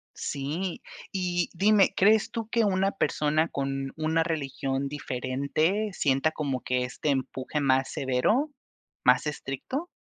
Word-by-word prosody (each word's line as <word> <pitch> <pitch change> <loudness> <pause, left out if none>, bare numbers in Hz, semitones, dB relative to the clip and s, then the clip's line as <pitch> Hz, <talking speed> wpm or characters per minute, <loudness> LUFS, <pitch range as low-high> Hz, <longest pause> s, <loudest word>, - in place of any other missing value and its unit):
Sí, 155 +7 -3 0.3
y 180 -2 0
dime, 200 +2 +4
¿crees 215 +3 +4
tú 225 -2 -4
que 230 -2 +2
una 195 0 +2
persona, 155 -2 +1
con 135 -2 -3
una 160 +1 +1
religión 135 -3 -2
diferente, 145 +9 -1
sienta 140 +1 +2
como 140 -5 -2
que 125 0 0
este 125 +4 -3
empuje 135 +2 -1
más 135 -1 +2
severo, 175 - +1 0.5
más 125 +2 +5
estricto? 150 - -4
150 Hz, 125 wpm, -27 LUFS, 135-190 Hz, 0.5 s, más